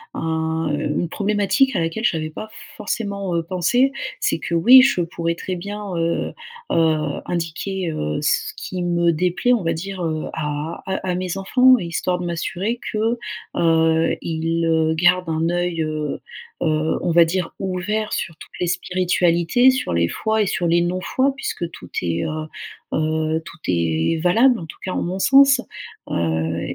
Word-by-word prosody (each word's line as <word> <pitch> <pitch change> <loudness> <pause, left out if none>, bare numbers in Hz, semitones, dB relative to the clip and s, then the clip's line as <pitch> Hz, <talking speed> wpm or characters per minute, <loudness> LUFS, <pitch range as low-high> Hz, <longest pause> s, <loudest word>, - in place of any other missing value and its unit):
un, 160 0 -1
heu, 145 - -1 0.2
une 175 - 0
problématique 210 - +1
à - - +2
laquelle 165 +6 -2
j'avais 160 -8 0
pas 215 +7 -7 0.3
forcément 200 -4 -3
heu 165 - 0
pensé. 190 +10 +2 0.3
C'est - - 0
que 170 - -3
oui, 245 +10 +8
je 255 -8 +3
pourrais 170 0 -2
très 185 +2 -4
bien, 200 +2 -6
heu 165 0 -1 0.4
heu 160 -2 +1
indiquer, 175 +2 -3
heu, 75 - -2
ce - - 0
qui 185 -1 -5
me 175 -1 +2
déplaît, 180 +9 +1
on 230 -6 +1
va 165 0 +1
dire, 185 +3 -5
heu, 155 -2 -2
à 150 +1 -4
à 190 - -1 0.2
à - - -1
mes 185 0 -3
enfants, 250 +6 +5
histoire 180 -1 -2
de 180 - -4
m'assurer 185 +7 -2
que, 225 +2 0 0.4
heu, 165 -1 +3
ils, 165 0 -1
heu, 160 -1 +2
gardent 175 +1 +3
un 160 +1 0
œil, 175 -1 -1
heu 155 -2 -3 0.4
heu, 155 -1 +1
on - - +1
va 170 +1 +7
dire, 175 +1 -2
ouvert 195 +3 -2
sur 170 - -3
toutes - - -13
les 180 - 0
spiritualités, 180 +4 +2
sur 260 - 0
les 85 0 +2
fois 220 - 0
et 205 - +1
sur 180 - -1
les 170 +1 +3
non-fois, 185 +10 0
puisque 170 -9 -3
tout - - -12
est 85 -1 -1
heu 155 0 -4 0.5
heu, 155 0 0
tout - - -11
est 85 - +1
valable, 230 +9 +4
en 165 - -7
tout 155 - -11
cas 185 - -3
en - - -1
mon 185 +2 -3
sens. 270 +3 +6 0.5
Heu, 80 0 -1
170 Hz, 175 wpm, -21 LUFS, 160-195 Hz, 0.5 s, oui